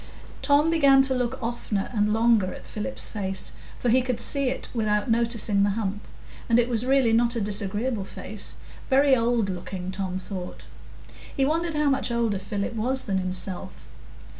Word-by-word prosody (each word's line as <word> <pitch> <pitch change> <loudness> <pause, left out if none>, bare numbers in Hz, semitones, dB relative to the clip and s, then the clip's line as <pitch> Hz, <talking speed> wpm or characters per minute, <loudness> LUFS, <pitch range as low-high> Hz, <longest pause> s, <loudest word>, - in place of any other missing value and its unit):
Tom 290 +3 +3
began 280 -4 +5
to 265 0 +2
look 250 0 -1
oftener 230 -4 -3
and 210 -1 +1
longer 220 -4 +3
at - - -10
Philip's 215 +5 0
face, 195 -3 -4 0.3
for 245 - -1
he 255 +3 +4
could 250 -2 -2
see 275 0 +3
it 265 - -4
without 215 -1 0
noticing 230 -3 +3
the 200 - +3
hump, 205 -1 -4 0.4
and 230 - +4
it 240 0 +3
was 240 0 0
really 265 -4 +3
not 235 +1 +2
a - - -1
disagreeable 205 +2 -1
face,—very 265 +8 -1
old 230 -3 +1
looking, 180 0 -5
Tom 190 -1 -3
thought. 185 -1 -7 0.7
He 270 - +3
wondered 325 +2 -1
how 295 -1 +2
much 270 -1 0
older 230 -4 0
Philip 200 +3 -4
was 255 +4 -1
than 190 -2 -1
himself. 185 0 -3
230 Hz, 165 wpm, -25 LUFS, 200-260 Hz, 0.7 s, began